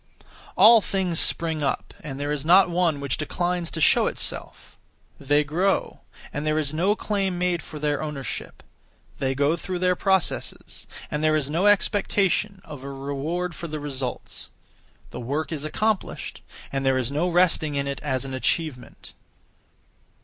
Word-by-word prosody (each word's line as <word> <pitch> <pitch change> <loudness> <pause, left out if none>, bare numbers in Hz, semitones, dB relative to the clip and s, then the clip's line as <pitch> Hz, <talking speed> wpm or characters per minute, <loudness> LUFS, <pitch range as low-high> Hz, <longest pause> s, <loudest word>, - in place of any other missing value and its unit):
All 220 +4 +8
things 185 -4 0
spring 160 -2 +1
up, 140 - -2
and 135 -2 -7
there 145 +1 -2
is 150 -2 -2
not 180 +3 +6
one 170 -4 +1
which 140 -4 -2
declines 175 +2 -2
to 165 - -5
show 155 - +4
itself; - - -4 0.4
they 145 +2 +2
grow, 175 +7 0 0.3
and 145 - -3
there 155 0 +1
is 150 -2 0
no 185 +6 +2
claim 195 -4 -1
made 175 -1 0
for 155 - -9
their 150 -1 -1
ownership; 150 -4 -5 0.6
they 135 0 0
go 145 +4 +2
through 180 +2 -4
their 180 0 +2
processes, 190 0 -1 0.2
and 150 +1 -2
there 155 0 +4
is 145 -2 0
no 175 +6 +2
expectation 200 -1 +2
(of 150 -5 -9
a 140 - -6
reward 145 +6 -3
for 170 - -6
the 155 -1 -5
results). 135 -3 -5 0.6
The - - -6
work 140 +7 -3
is 150 -3 -3
accomplished, 215 +6 -2 0.3
and 135 0 -2
there 135 -1 +3
is 130 0 -1
no 160 +5 0
resting 170 -4 +2
in 140 0 0
it 140 - -4
(as 135 -3 -2
an 135 - -6
achievement). 130 -1 -3
155 Hz, 165 wpm, -25 LUFS, 140-180 Hz, 0.6 s, All